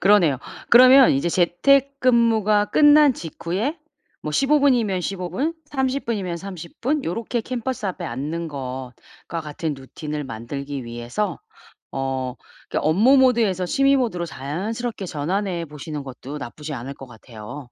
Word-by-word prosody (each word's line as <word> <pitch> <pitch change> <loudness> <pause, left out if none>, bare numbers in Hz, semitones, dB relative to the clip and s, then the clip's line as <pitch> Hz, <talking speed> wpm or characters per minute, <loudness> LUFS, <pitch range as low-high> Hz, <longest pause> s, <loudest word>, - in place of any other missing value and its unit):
그러네요. 180 -10 +4 0.3
그러면 255 +2 +8
이제 140 +6 +1
재택근무가 230 +2 +3
끝난 295 +2 +6
직후에 190 - -3 0.4
뭐 150 - -3
15 285 - +3
분이면 235 -9 +2
15 180 -1 -4
분, 295 - -1
30 270 -1 -1
분이면 195 -7 -2
30 175 -2 -9
분 290 +4 +1
요렇게 230 +5 -2
캔버스 250 -1 -4
앞에 185 - -4
앉는 155 +7 -4
것과 130 +4 -7
같은 155 0 -4
루틴을 150 +2 -6
만들기 135 +3 -6
위해서 120 - -3 0.5
어. 130 -1 -3 0.3
그러니까 - - -1
업무 220 - +5
모드에서 225 -8 +3
취미 275 +8 +3
모드로 195 -9 -1
자연스럽게 195 - -4
전환해 175 +3 -2
보시는 150 -1 -7
것도 135 +2 -8
나쁘지 150 +3 -7
않을 130 +2 -6
것 135 - -11
같아요. 115 +3 -10
180 Hz, 300 characters per minute, -22 LUFS, 145-240 Hz, 0.5 s, 그러면